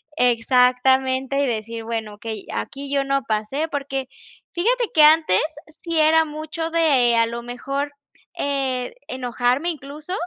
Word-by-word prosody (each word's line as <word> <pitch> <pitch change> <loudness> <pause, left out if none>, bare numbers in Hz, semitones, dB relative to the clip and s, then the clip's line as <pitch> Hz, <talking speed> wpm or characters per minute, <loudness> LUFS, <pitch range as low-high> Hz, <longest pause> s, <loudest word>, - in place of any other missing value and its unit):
exactamente 260 +2 +2
y - - +2
decir: 230 -1 -4
"Bueno, 225 -2 -4
okey, 220 -1 -6
aquí 275 +1 -5
yo 280 -1 +2
no 275 0 0
pasé". 220 +9 -1
Porque 270 -2 -3 0.5
fíjate 475 +7 +1
que 310 - +6
antes 310 - +5 0.4
sí 335 -2 -2
era 315 +1 +5
mucho 315 +1 -5
de 280 -8 +4
a 230 - +4
lo 235 +1 -5
mejor, 275 +4 -4 0.5
eh, 265 -3 -1
enojarme 250 +4 -1
incluso, 300 +3 -8
270 Hz, 135 wpm, -22 LUFS, 245-305 Hz, 0.5 s, que